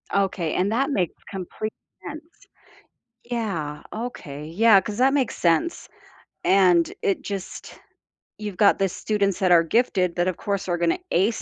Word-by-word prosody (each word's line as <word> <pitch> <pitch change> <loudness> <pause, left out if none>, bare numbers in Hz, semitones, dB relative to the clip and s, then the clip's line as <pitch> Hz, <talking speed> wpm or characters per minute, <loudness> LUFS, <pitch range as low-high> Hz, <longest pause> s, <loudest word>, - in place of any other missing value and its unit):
Okay, 190 -4 0
and 190 +3 +1
that 270 +5 +1
makes 185 - -1
complete 195 +3 -5 0.3
sense. 310 +1 -7 1.0
Yeah, 195 -12 -3
okay, 180 - -6
yeah, 200 +5 +5
'cause 210 +2 -6
that 265 +2 +4
makes 265 -4 0
sense, 170 - +1 0.6
and 180 -3 +4
it 195 - 0
just 195 -2 -7 0.6
you've 210 -3 -6
got 205 -2 +4
the 195 - +3
students 200 0 -1
that 185 -2 +2
are 170 -1 +7
gifted 180 -2 +1
that, 175 +1 +1
of 185 - -4
course, 200 -2 -3
are 175 - +1
gonna 170 -1 +1
ace 205 +6 +1
195 Hz, 150 wpm, -24 LUFS, 175-220 Hz, 1.0 s, are